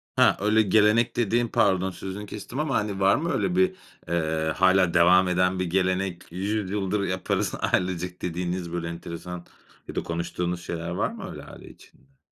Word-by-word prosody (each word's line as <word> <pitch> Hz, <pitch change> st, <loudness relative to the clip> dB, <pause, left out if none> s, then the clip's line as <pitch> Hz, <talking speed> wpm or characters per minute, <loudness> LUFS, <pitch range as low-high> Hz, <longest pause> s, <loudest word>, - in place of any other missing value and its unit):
He, -, -, +5 dB
öyle 105 Hz, +2 st, +3 dB
gelenek 110 Hz, +3 st, +3 dB
dediğin 120 Hz, +1 st, +1 dB
pardon 95 Hz, -3 st, +2 dB
sözünü 95 Hz, +3 st, -7 dB
kestim 105 Hz, +6 st, -7 dB
ama 150 Hz, -3 st, 0 dB
hani 100 Hz, -2 st, -1 dB
var 95 Hz, 0 st, +4 dB
mı 165 Hz, +3 st, -1 dB
öyle 180 Hz, -, 0 dB
bir, 185 Hz, 0 st, +3 dB, 0.3 s
eee, 80 Hz, -1 st, 0 dB
hâlâ 95 Hz, -2 st, +4 dB
devam 90 Hz, +2 st, +5 dB
eden 90 Hz, +1 st, +1 dB
bir 90 Hz, -, 0 dB
gelenek 95 Hz, 0 st, -1 dB
100 100 Hz, +2 st, -2 dB
yıldır 100 Hz, 0 st, -1 dB
yaparız 95 Hz, -1 st, -1 dB, 0.2 s
ailecek 90 Hz, -1 st, -1 dB
dediğiniz 90 Hz, 0 st, -3 dB
böyle 85 Hz, -1 st, -3 dB
enteresan 85 Hz, +1 st, -7 dB, 0.4 s
ya -, -, -8 dB
da -, -, -1 dB
konuştuğunuz 85 Hz, +1 st, -3 dB
şeyler 85 Hz, 0 st, -4 dB
var 85 Hz, -, -1 dB
mı -, -, -8 dB
öyle -, -, -9 dB
aile -, -, -12 dB
içinde? 135 Hz, 0 st, -20 dB
95 Hz, 170 wpm, -25 LUFS, 85-105 Hz, 0.4 s, He